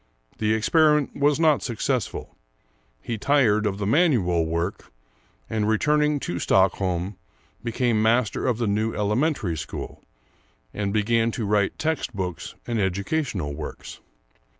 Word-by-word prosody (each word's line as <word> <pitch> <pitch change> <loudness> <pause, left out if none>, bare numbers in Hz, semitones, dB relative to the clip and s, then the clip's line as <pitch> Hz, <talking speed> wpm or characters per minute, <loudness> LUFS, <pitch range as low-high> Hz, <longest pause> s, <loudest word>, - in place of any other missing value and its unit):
The 110 0 +2
experiment 150 +5 +3
was 145 +1 +2
not 155 -3 +4
successful, 125 0 -3 0.7
he 115 -3 -4
tired 110 -6 +3
of 100 -1 -2
the 100 - -3
manual 105 - +2
work, 85 +4 -3 0.6
and 110 -1 -1
returning 150 +6 +2
to 85 - -3
Stockholm, 95 0 +1 0.5
became 120 -1 +1
master 115 +2 +1
of 125 -4 +1
the 120 - -1
new 110 +2 0
Elementary 105 - 0
School, 80 0 -7 0.7
and 100 -1 -2
began 115 +2 +2
to 115 - -3
write 100 -1 +1
text 160 -7 -2
books 90 -3 -4
and 115 -2 -2
educational 100 - -1
works. - - -8
110 Hz, 125 wpm, -24 LUFS, 100-130 Hz, 0.7 s, not